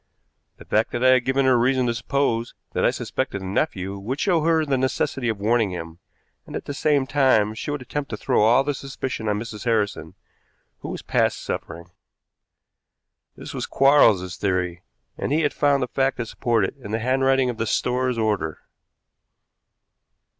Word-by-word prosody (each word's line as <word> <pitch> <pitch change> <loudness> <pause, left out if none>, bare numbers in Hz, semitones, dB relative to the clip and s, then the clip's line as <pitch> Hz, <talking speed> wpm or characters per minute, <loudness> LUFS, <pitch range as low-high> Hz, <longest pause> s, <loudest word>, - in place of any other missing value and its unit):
The - - -14
fact 110 +1 0
that 120 - -1
I 130 - +6
had 130 -1 +4
given 135 +1 +2
her 130 - +4
a - - +4
reason 130 +1 +2
to 120 - +1
suppose 115 -1 -1 0.2
that - - 0
I - - +5
suspected 100 - -3
the - - -7
nephew 95 0 -2
would 125 +8 -4
show 175 -5 +2
her 160 0 +2
the 140 -2 +1
necessity 130 -1 -1
of 110 -3 -2
warning 110 +1 +2
him, 85 -2 -7 0.5
and - - -8
at - - -5
the 145 - -4
same 145 -1 +1
time 130 -7 +3
she 110 - -6
would 145 -3 -3
attempt 140 +3 -4
to 105 - -4
throw - - +1
all 120 +5 +5
the 145 - -1
suspicion 130 -4 -4
on 105 - 0
Mrs. 110 0 -7
Harrison, 110 -3 -1 0.6
who - - -7
was - - -6
past - - 0
suffering. 85 +1 -6 1.5
This - - -8
was - - -4
Quarles's 105 -10 +4
theory, 90 -3 -1 0.4
and - - -2
he 155 +2 +2
had 145 - 0
found 140 -2 +2
the - - -2
fact 135 +2 0
to 120 - -2
support 115 -2 0
it 95 - -5
in 125 -7 -10
the 110 - -1
handwriting 130 +2 +2
of 115 - -10
the 115 - -2
store's 125 +1 0
order. 105 -9 -1
120 Hz, 190 wpm, -23 LUFS, 105-135 Hz, 1.5 s, I